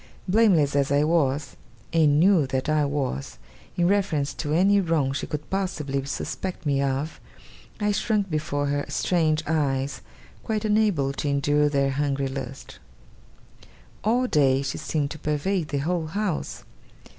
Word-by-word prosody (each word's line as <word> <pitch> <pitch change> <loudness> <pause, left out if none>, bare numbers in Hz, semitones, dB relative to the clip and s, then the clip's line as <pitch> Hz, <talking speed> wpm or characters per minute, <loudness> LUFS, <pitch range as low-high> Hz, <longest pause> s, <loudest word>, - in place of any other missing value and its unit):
Blameless 180 -9 +3
as 140 -1 +1
I 145 +1 +3
was, 145 -3 +1 0.4
and 150 -3 +4
knew 175 -5 +4
that 130 0 -2
I 155 -1 +2
was, 140 - -3 0.4
in 175 -1 +3
reference 180 -8 +1
to 150 - -4
any 195 +5 +4
wrong 160 -6 0
she 140 - -3
could 150 0 -5
possibly 150 -8 -2
suspect 180 +5 -5
me 140 -2 +1
of, 140 +3 -2 0.6
I 210 -1 +1
shrunk 205 -1 0
before 150 -3 -2
her 145 0 0
strange 155 0 +1
eyes, 140 -3 -1 0.4
quite 220 -2 -2
unable 210 -11 +2
to 145 - -3
endure 145 +1 +2
their 140 -1 +1
hungry 140 0 -1
lustre. 135 0 -7 1.2
All 240 +4 +2
day, 140 - +3
she 135 - -3
seemed 145 -3 -2
to 155 - -7
pervade 155 +4 -1
the 145 - -2
whole 160 +3 -1
house. 195 0 -3
150 Hz, 145 wpm, -25 LUFS, 140-180 Hz, 1.2 s, and